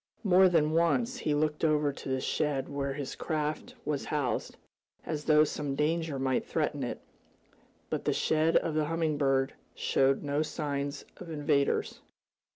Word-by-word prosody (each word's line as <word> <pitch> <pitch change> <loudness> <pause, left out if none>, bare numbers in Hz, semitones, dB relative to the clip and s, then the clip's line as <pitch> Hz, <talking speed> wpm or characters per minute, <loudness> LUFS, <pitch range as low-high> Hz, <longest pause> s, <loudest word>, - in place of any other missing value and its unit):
More 190 -2 +6
than 155 -3 +3
once 200 +10 +2
he 150 -8 0
looked 150 +1 0
over 150 -2 +2
to 135 - -8
the 130 0 0
shed 140 -1 -1
where 140 -1 -2
his 140 -1 -5
craft 155 -1 -3
was 150 -2 -2
housed, 150 -2 -2 0.5
as 150 -2 -4
though 155 -1 +6
some 145 -2 -2
danger 155 0 0
might 130 -1 0
threaten - - -1
it. - - -4 0.9
But - - -2
the - - +2
shed 160 +1 +2
of 165 - 0
the 155 0 +1
Humming 160 -2 -1
Bird 135 -2 +2 0.2
showed 135 0 +2
no 145 +1 0
signs 145 -2 -3
of 180 - -9
invaders. 145 -2 0
150 Hz, 160 wpm, -30 LUFS, 140-160 Hz, 0.9 s, More